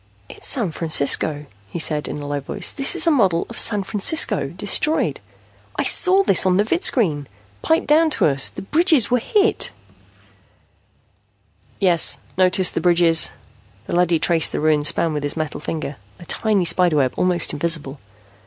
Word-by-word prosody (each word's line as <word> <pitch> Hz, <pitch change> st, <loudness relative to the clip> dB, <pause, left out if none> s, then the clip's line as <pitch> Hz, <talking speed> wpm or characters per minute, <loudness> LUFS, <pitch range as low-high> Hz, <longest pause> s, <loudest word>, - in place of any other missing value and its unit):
"It's -, -, -5 dB
San 225 Hz, -, +3 dB
Francisco," 150 Hz, -1 st, 0 dB, 0.2 s
he -, -, -7 dB
said 150 Hz, -2 st, -3 dB
in -, -, -6 dB
a 145 Hz, -, -8 dB
low 145 Hz, 0 st, -3 dB
voice. 175 Hz, +7 st, -2 dB
"This 275 Hz, -1 st, +1 dB
is -, -, +3 dB
a 335 Hz, -, +3 dB
model 190 Hz, -, +1 dB
of 235 Hz, -, -5 dB
San 205 Hz, -3 st, +2 dB
Francisco, 210 Hz, +11 st, 0 dB
destroyed. 310 Hz, +1 st, -2 dB, 0.6 s
I -, -, -1 dB
saw 385 Hz, +1 st, +3 dB
this 195 Hz, -, +2 dB
on 185 Hz, -1 st, +1 dB
the 205 Hz, -, +2 dB
vidscreen, 215 Hz, -, 0 dB, 0.3 s
piped 320 Hz, -, 0 dB
down 315 Hz, +2 st, +3 dB
to -, -, +1 dB
us. 140 Hz, -2 st, +1 dB
The -, -, -10 dB
bridges 310 Hz, -, +1 dB
were 250 Hz, -, +2 dB
hit 415 Hz, -, 0 dB, 1.5 s
" -, -, -44 dB, 0.5 s
"Yes, 175 Hz, -4 st, +3 dB, 0.2 s
notice 185 Hz, 0 st, +2 dB
the -, -, -3 dB
bridges." 170 Hz, -2 st, +3 dB, 0.6 s
The -, -, -5 dB
leady 175 Hz, -1 st, +2 dB
traced 165 Hz, 0 st, 0 dB
the -, -, -3 dB
ruined 150 Hz, -1 st, +1 dB
span 165 Hz, +1 st, +1 dB
with 150 Hz, -, -3 dB
his 145 Hz, +2 st, -2 dB
metal 155 Hz, -2 st, -4 dB
finger, 150 Hz, -2 st, -6 dB, 0.2 s
a 175 Hz, -, -14 dB
tiny 205 Hz, 0 st, -1 dB
spider 175 Hz, -1 st, +2 dB
web, 135 Hz, -3 st, 0 dB
almost 180 Hz, -2 st, +1 dB
invisible. 150 Hz, -2 st, -1 dB
175 Hz, 170 wpm, -19 LUFS, 155-225 Hz, 1.5 s, San